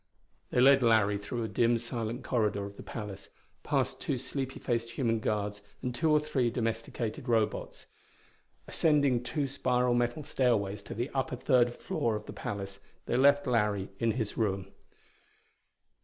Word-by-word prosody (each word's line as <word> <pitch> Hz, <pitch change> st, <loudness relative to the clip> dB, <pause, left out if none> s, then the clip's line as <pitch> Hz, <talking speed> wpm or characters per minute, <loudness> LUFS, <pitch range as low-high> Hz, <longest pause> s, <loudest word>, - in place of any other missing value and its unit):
They -, -, +1 dB
led 135 Hz, +1 st, +7 dB
Larry 110 Hz, -4 st, +4 dB
through 115 Hz, +4 st, -4 dB
a -, -, -2 dB
dim 115 Hz, +1 st, +2 dB
silent 115 Hz, 0 st, -4 dB
corridor 105 Hz, -5 st, 0 dB
of 100 Hz, 0 st, -9 dB
the -, -, -10 dB
palace, 105 Hz, -4 st, -7 dB, 0.3 s
past -, -, -1 dB
two 135 Hz, -, -1 dB
sleepy 135 Hz, +1 st, -4 dB
faced 115 Hz, -2 st, -1 dB
human 115 Hz, -3 st, +1 dB
guards 105 Hz, -1 st, -2 dB, 0.2 s
and 125 Hz, -1 st, -2 dB
two 160 Hz, +6 st, +1 dB
or 150 Hz, 0 st, +5 dB
three 135 Hz, -5 st, 0 dB
domesticated 115 Hz, 0 st, -3 dB
Robots. 110 Hz, -2 st, 0 dB, 0.8 s
Ascending 145 Hz, -6 st, +3 dB
two 140 Hz, +4 st, -2 dB
spiral 125 Hz, -2 st, +1 dB
metal 120 Hz, +5 st, 0 dB
stairways 110 Hz, -8 st, +1 dB
to -, -, -7 dB
the 120 Hz, +5 st, -2 dB
upper 130 Hz, -1 st, -1 dB
third 120 Hz, -1 st, +3 dB
floor 115 Hz, -2 st, -1 dB
of 105 Hz, 0 st, -5 dB
the -, -, -8 dB
palace 100 Hz, -1 st, -5 dB, 0.3 s
they -, -, -1 dB
left 140 Hz, +2 st, +5 dB
Larry 105 Hz, -6 st, +1 dB
in 115 Hz, -1 st, +2 dB
his 110 Hz, -3 st, -3 dB
room. 95 Hz, -3 st, -1 dB
120 Hz, 155 wpm, -30 LUFS, 105-130 Hz, 0.8 s, led